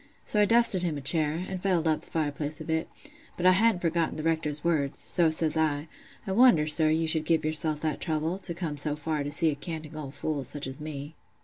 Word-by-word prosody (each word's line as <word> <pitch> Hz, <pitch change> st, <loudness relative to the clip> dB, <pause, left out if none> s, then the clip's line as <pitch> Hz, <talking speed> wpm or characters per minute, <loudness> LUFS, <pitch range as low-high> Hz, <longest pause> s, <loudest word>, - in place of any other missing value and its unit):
So 210 Hz, -, +1 dB
I -, -, +5 dB
dusted 230 Hz, -4 st, +4 dB
him 165 Hz, -4 st, -2 dB
a -, -, -6 dB
chair, 155 Hz, +4 st, +1 dB
an' 190 Hz, -1 st, -5 dB
fettled 180 Hz, -3 st, 0 dB
up 155 Hz, -1 st, +1 dB
th' -, -, -15 dB
fireplace 150 Hz, -1 st, -2 dB
a -, -, -6 dB
bit; 160 Hz, +1 st, -2 dB, 0.5 s
but 180 Hz, -, -3 dB
I 185 Hz, -, +8 dB
hadn't 205 Hz, 0 st, +3 dB
forgotten 165 Hz, -1 st, 0 dB
th' 155 Hz, -, -5 dB
Rector's 155 Hz, -2 st, -1 dB
words, 150 Hz, -5 st, 0 dB
so 170 Hz, -3 st, +2 dB
says 160 Hz, 0 st, 0 dB
I, 155 Hz, -1 st, 0 dB, 0.4 s
'I 195 Hz, -, -4 dB
wonder, 220 Hz, -7 st, +5 dB
sir, 155 Hz, +1 st, +5 dB
you 160 Hz, +1 st, +1 dB
should 160 Hz, -1 st, 0 dB
give 160 Hz, 0 st, +1 dB
yourself 155 Hz, -1 st, 0 dB
that 155 Hz, -2 st, -2 dB
trouble, 160 Hz, +2 st, -2 dB
to 170 Hz, -3 st, 0 dB
come 160 Hz, -4 st, -4 dB
so 145 Hz, +1 st, -1 dB
far 150 Hz, 0 st, -3 dB
to 145 Hz, -, -5 dB
see 160 Hz, +1 st, +2 dB
a -, -, -4 dB
"canting 155 Hz, 0 st, -7 dB
old 145 Hz, -3 st, -7 dB
fool," 150 Hz, -3 st, -3 dB
such 140 Hz, +3 st, -4 dB
as 130 Hz, +2 st, -7 dB
me. 150 Hz, 0 st, -7 dB
160 Hz, 235 wpm, -27 LUFS, 150-170 Hz, 0.5 s, I